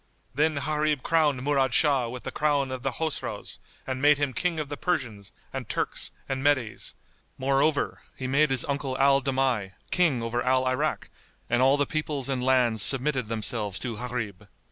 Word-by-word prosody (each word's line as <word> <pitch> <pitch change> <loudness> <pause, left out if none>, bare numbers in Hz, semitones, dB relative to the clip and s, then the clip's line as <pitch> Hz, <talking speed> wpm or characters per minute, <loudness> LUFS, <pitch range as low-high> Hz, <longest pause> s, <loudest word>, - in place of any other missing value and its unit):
Then 155 +3 +2
Gharib 150 0 0
crowned 150 -6 +2
Murad 135 -3 +2
Shah 140 -6 +3
with 125 +1 -7
the - - -4
crown 145 -3 +1
of 130 -1 -4
the 135 - 0
Chosroës 160 +1 -3 0.3
and 130 0 -3
made 145 0 +6
him 145 -2 -1
King 170 +5 -1
of 150 - -3
the 145 - -5
Persians 120 - -2 0.2
and - - -5
Turks - - 0 0.2
and 135 0 -3
Medes; 130 -6 0 0.4
moreover, 135 +3 +1
he 130 - -6
made 140 +4 +3
his 135 -2 +2
uncle 140 -2 -2
Al 140 0 +4
Damigh, 130 -8 0 0.2
King 155 -10 +2
over 120 +1 -1
Al 130 +1 +2
Irak, 130 0 -1 0.4
and 120 0 +3
all 135 +2 +5
the 145 - +2
peoples 150 -4 -3
and 130 -2 -1
lands 125 -4 +3
submitted 135 0 +2
themselves 110 -3 -2
to 120 -3 -4
Gharib. 110 -5 -5
135 Hz, 175 wpm, -27 LUFS, 125-145 Hz, 0.4 s, made